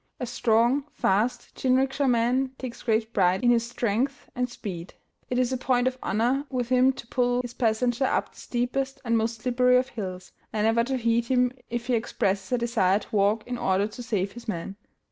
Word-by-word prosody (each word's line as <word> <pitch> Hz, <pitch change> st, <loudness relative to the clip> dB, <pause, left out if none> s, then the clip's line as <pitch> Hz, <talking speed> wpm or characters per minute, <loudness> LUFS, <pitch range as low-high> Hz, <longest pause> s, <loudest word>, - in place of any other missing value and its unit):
A 250 Hz, -, -2 dB
strong, 240 Hz, +3 st, +2 dB
fast 235 Hz, +5 st, 0 dB
jinrikisha 265 Hz, +1 st, +1 dB
man 250 Hz, +3 st, +1 dB
takes 255 Hz, -2 st, -7 dB
great 220 Hz, 0 st, 0 dB
pride 185 Hz, +2 st, +2 dB
in 240 Hz, -, +5 dB
his 235 Hz, 0 st, +1 dB
strength 240 Hz, +5 st, -2 dB
and 250 Hz, 0 st, -1 dB
speed. 185 Hz, -7 st, -7 dB, 0.3 s
It 250 Hz, -, -1 dB
is 255 Hz, 0 st, +1 dB
a -, -, 0 dB
point 250 Hz, 0 st, +1 dB
of 260 Hz, 0 st, -2 dB
honor 245 Hz, +7 st, +1 dB
with 245 Hz, -3 st, -2 dB
him 255 Hz, +1 st, +5 dB
to 250 Hz, -, -10 dB
pull 245 Hz, +1 st, +1 dB
his 245 Hz, -1 st, -7 dB
passenger 240 Hz, +2 st, +1 dB
up -, -, 0 dB
the -, -, -16 dB
steepest 265 Hz, +3 st, -2 dB
and 230 Hz, -1 st, +2 dB
most 225 Hz, 0 st, -1 dB
slippery 250 Hz, 0 st, +4 dB
of 255 Hz, +1 st, 0 dB
hills, 185 Hz, -5 st, -6 dB, 0.2 s
and 215 Hz, -1 st, 0 dB
never 225 Hz, +1 st, +3 dB
to 265 Hz, +1 st, -1 dB
heed 235 Hz, -1 st, +1 dB
him 250 Hz, 0 st, +2 dB, 0.2 s
if 240 Hz, 0 st, -3 dB
he 250 Hz, -, 0 dB
expresses 200 Hz, -3 st, -1 dB
a 250 Hz, -, +3 dB
desire 230 Hz, -5 st, +2 dB
to 215 Hz, -, -7 dB
walk 205 Hz, +2 st, +2 dB
in 245 Hz, -1 st, -4 dB
order 190 Hz, +1 st, +2 dB
to 230 Hz, -, -9 dB
save 205 Hz, -5 st, -1 dB
his 240 Hz, 0 st, -11 dB
man. 195 Hz, -1 st, -4 dB
240 Hz, 200 wpm, -26 LUFS, 220-250 Hz, 0.3 s, in